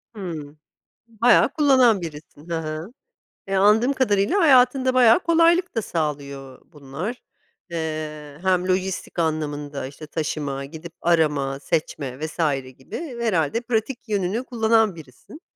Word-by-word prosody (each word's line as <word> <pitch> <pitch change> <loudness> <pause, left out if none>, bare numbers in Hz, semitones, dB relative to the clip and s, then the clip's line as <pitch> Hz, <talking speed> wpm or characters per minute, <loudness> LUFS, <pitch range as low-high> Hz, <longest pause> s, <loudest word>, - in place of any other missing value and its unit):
Hımm, 160 -7 -7 0.5
bayağı 230 +1 +4
kullanan 260 -8 +4
birisin, 155 -1 -10
he - - -1
he. 155 -1 -3 0.7
E, 195 - -1
anladığım 215 +7 +4
kadarıyla 235 - +2
hayatında 260 -3 +4
bayağı 245 -1 +6
kolaylık 335 0 +3
da 225 - +1
sağlıyor 140 -6 -4
bunlar, 160 - -7 0.5
eee, 155 -3 -5
hem 185 -1 +1
lojistik 185 -1 -2
anlamında 150 -4 -2
işte 145 +3 -11
taşıma, 145 -3 -3
gidip 160 +3 -10
arama, 150 -5 +1
seçme 140 -4 -3
vs. 155 +1 -6 0.4
gibi 245 - -7
herhâlde 200 -2 +1
pratik 240 +1 -2
yönünü 205 +3 -1
kullanan 225 -5 +2
birisin. 170 - -14
175 Hz, 120 wpm, -23 LUFS, 150-230 Hz, 0.7 s, bayağı